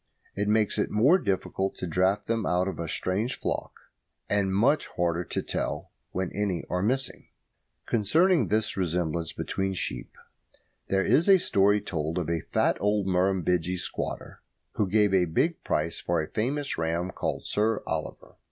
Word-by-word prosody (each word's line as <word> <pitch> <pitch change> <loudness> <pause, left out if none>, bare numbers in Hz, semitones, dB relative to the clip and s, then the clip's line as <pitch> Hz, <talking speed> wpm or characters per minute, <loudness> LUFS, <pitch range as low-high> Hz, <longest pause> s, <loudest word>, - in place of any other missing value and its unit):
It 100 +1 -1
makes 105 0 +2
it - - +1
more 135 - +4
difficult 95 - -1
to - - -5
draft 95 +4 +1
them 115 -1 0
out 90 0 +1
of 95 -5 -4
a 85 - -3
strange 105 - -1
flock, - - -2 0.6
and 100 -2 +1
much 120 +10 +2
harder 85 0 +1
to - - -3
tell - - -3 0.2
when 95 -1 -3
any 100 -4 -1
are 90 0 0
missing. 130 +5 -1 0.6
Concerning 160 - +3
this 110 0 0
resemblance 85 -3 -1
between 95 0 -2
sheep, - - -3 0.7
there 95 0 +1
is 170 +6 +3
a 195 - +9
story 105 - +3
told 80 -4 -3
of 85 -2 -1
a 85 -1 0
fat - - +2
old 105 -1 +1
Murrumbidgee 90 -1 +1
squatter - - -5 0.3
who 105 - 0
gave 105 0 +3
a 90 -2 +4
big 155 - 0
price 80 +2 -1
for 85 -1 0
a 80 - -2
famous 135 - -1
ram 85 +3 -1
called - - -3
Sir 110 +1 0
Oliver. - - -5
95 Hz, 160 wpm, -27 LUFS, 90-110 Hz, 0.7 s, a